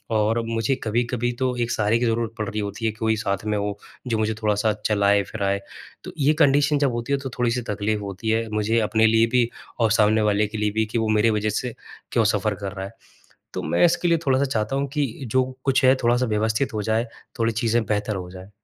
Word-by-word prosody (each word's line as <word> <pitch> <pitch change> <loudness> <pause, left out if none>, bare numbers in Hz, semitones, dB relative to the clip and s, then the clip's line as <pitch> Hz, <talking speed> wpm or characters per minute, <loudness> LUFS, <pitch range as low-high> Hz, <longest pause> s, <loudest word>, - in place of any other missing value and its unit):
और 110 +2 +2
मुझे 115 +3 0
कभी-कभी 120 +2 0
तो 130 -1 0
एक 120 0 -1
सहारे 110 0 +1
की 120 - +1
ज़रूरत 115 -1 -1
पड़ 110 - -3
रही 105 - -3
होती 105 +2 -4
है, 110 - +2
कि 110 - -18
कोई 110 -1 +1
साथ 100 -2 -2
में 105 -1 0
हो 100 0 -2 0.3
जो 115 -2 0
मुझे 110 0 0
थोड़ा-सा 105 0 +1
चलाएँ-फिराएँ। 100 -1 +1 0.4
तो - - -7
ये 145 +1 +3
कंडीशन 145 0 +4
जब 140 -2 +2
होती 120 +3 -3
है 140 - +1
तो 135 -1 -5
थोड़ी 120 -1 +1
सी 125 +1 -1
तकलीफ़ 105 0 -1
होती 100 +2 -5
है, 115 +1 +1
मुझे 105 +2 +1
अपने 110 0 +2
लिए 115 +1 +4
भी 120 -2 +3 0.3
और 115 -2 +3
सामने 110 0 +4
वाले 105 0 +2
के 110 +1 -6
लिए 105 0 0
भी 110 +1 0
कि, 110 +2 -3
वो 110 -1 0
मेरी 110 +1 +3
वज़ह 105 -1 0
से 115 +3 -3 0.4
क्यों - - +3
सफ़र - - 0
कर 100 -1 -5
रहा 95 -1 -5
है। 100 - -8 0.6
तो - - -3
मैं - - +2
इसके 175 +1 +3
लिए 170 -1 +3
थोड़ा-सा 135 +1 +3
चाहता 115 -2 -1
हूँ 140 +1 0
कि, 145 +1 0 0.2
जो 130 +3 +2 0.2
कुछ 135 -1 +2
है 130 +1 +7
थोड़ा-सा 120 +2 +3
व्यवस्थित 110 +3 0
हो 105 - -1
जाए, 110 +3 0 0.3
थोड़ी 115 0 +1
चीज़ें 115 +1 +1
बेहतर 105 0 -1
हो 90 -1 -6
जाएँ। 95 +1 -11
110 Hz, 235 wpm, -23 LUFS, 105-120 Hz, 0.6 s, है